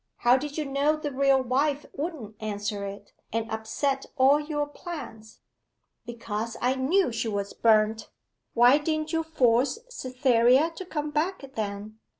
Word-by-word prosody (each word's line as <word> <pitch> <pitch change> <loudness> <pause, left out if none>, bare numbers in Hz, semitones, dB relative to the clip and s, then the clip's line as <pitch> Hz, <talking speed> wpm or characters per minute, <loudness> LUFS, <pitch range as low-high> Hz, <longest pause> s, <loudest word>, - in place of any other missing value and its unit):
How 240 +1 +4
did 290 +3 -3
you 305 - -1
know 280 +2 +1
the 305 -1 -4
real 270 0 +3
wife 280 +3 0
wouldn't 280 - -5
answer 205 -1 -3
it, 195 +1 -10 0.2
and 225 0 -1
upset 245 +5 -2
all 270 +3 +5
your 295 -1 -2
plans?' 270 -8 -9 0.7
'Because 230 -1 -4
I 250 +1 +2
knew 270 +5 +2
she 225 0 -2
was 200 -2 -3
burnt.' 220 -1 +2 0.5
'Why 245 +4 +6
didn't 310 +1 -2
you 325 - +2
force 265 - +2
Cytherea 255 - +3
to 370 +3 -8
come 300 -3 -3
back, 300 -2 -2
then? 210 0 -5
260 Hz, 150 wpm, -27 LUFS, 225-295 Hz, 0.7 s, Why